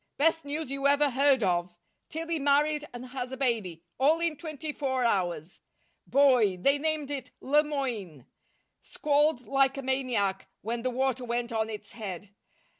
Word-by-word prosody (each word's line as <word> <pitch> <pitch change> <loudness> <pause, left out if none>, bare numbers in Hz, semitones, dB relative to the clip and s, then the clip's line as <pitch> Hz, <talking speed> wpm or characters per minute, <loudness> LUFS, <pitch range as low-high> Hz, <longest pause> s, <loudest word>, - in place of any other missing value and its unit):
Best 325 +1 +2
news 290 -1 -3
you 275 0 +1
ever 285 0 +3
heard 270 -1 +3
of! 175 -1 0 0.3
Tillie 325 +1 -3
married 295 +1 +2
and 245 +1 -8
has 250 -1 -5
a 260 - -5
baby 215 -11 -1 0.2
all 300 +5 +4
in 335 -2 0
twenty 310 0 -5
four 260 -3 -1
hours! 180 -6 -1 0.5
Boy 250 -9 +4
they 275 +10 +3
named 310 -2 0
it 275 -2 -4
Le 295 +3 +3
Moyne. 235 - -4 0.6
Squalled 295 -3 +1
like 275 0 +2
a 275 - -4
maniac 250 -8 -1 0.2
when 230 +3 -2
the 255 - -1
water 260 0 -1
went 240 0 -2
on 220 -1 -1
its 215 -1 -7
head. 200 -3 -7
265 Hz, 160 wpm, -28 LUFS, 225-290 Hz, 0.6 s, all